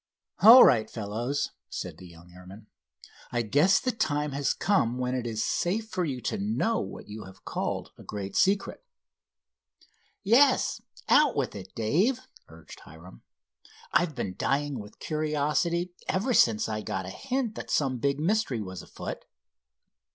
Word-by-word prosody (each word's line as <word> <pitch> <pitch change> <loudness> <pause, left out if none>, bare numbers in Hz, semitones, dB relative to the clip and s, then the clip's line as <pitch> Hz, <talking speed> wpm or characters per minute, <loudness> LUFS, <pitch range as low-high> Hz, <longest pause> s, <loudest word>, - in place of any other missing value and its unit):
"All 235 +4 +11
right, 110 -3 +4
fellows," 115 +6 -3 0.2
said - - -6
the 90 - -11
young 85 +1 -16
airman, 90 +4 -13 0.7
"I 120 -1 0
guess 145 - +3
the 255 - -1
time 150 -10 -1
has 140 0 0
come 125 - +1
when 125 0 -2
it 125 -2 -2
is 110 -1 -2
safe 215 +5 -1
for 185 - -2
you 130 -5 -4
to 215 - -3
know 220 +2 0
what - - -7
you 105 +1 -8
have 95 0 -15
called - - -3
a - - -11
great 100 -2 -6
secret." 195 - +1 1.4
"Yes, 255 +6 +4 0.3
out 300 - +5
with 135 -3 -1
it, 95 -2 -10
Dave," 185 - +1 0.3
urged 80 0 -14
Hiram, 80 -4 -14 0.7
"I've 170 -4 +2
been 100 -6 -3
dying 140 +3 -1
with 105 0 -11
curiosity 155 +3 -1
ever 210 +7 0
since 110 - +4
I 110 -1 -3
got 95 -4 -4
a - - -6
hint 260 - -3
that - - -8
some 130 -4 0
big 140 +2 0
mystery 175 - 0
was 95 -3 -6
afoot." - - -7
140 Hz, 155 wpm, -27 LUFS, -, 1.4 s, All